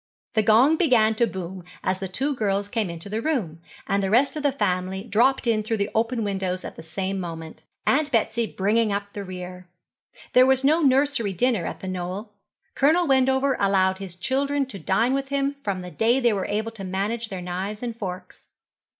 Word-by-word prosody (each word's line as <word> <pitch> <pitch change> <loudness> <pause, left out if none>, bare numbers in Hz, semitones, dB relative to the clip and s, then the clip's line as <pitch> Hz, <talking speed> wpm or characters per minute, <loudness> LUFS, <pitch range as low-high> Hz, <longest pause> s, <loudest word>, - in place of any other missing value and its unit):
The 220 - +3
gong 235 +9 +5
began 240 -10 +4
to 235 +2 +2
boom 185 -2 -6 0.2
as 185 0 0
the 195 - -3
two 270 +11 -1
girls 200 -4 -1
came 215 -4 -1
into 170 +2 -6
the 215 +3 -2
room, 210 - -2 0.3
and 200 -1 +1
the 195 - 0
rest 250 +9 +3
of 305 - -3
the 285 -1 +2
family 190 -5 -1
dropped 240 +5 +2
in 225 -2 +2
through 220 +1 -2
the 200 +1 -1
open 230 +1 0
windows 190 -2 -2
at - - -7
the - - -9
same 190 +4 -3
moment, 165 -3 -7 0.2
Aunt 300 +1 +2
Betsy 230 -1 +1
bringing 215 +3 +1
up 200 0 -3
the 205 - -5
rear. 180 -1 -8 0.7
There 255 +1 +7
was 265 0 +3
no 310 +5 +4
nursery 270 -6 +2
dinner 220 -2 +1
at - - -6
The 190 - -6
Knoll. 185 +4 -5 0.4
Colonel 320 +6 +3
Wendover 265 -1 +3
allowed 190 -1 +2
his 190 -3 -8
children 275 +8 0
to 245 -7 -9
dine 220 +9 +1
with 275 0 -1
him 280 0 -1
from 195 -3 -2
the 180 - -8
day 225 - +2
they 240 -3 +3
were 195 -2 -2
able 220 +2 -2
to 220 -4 -9
manage 205 +5 -2
their 190 - -5
knives 190 +5 -4
and 235 -2 -3
forks. 185 -4 -7
215 Hz, 200 wpm, -24 LUFS, 190-255 Hz, 0.7 s, There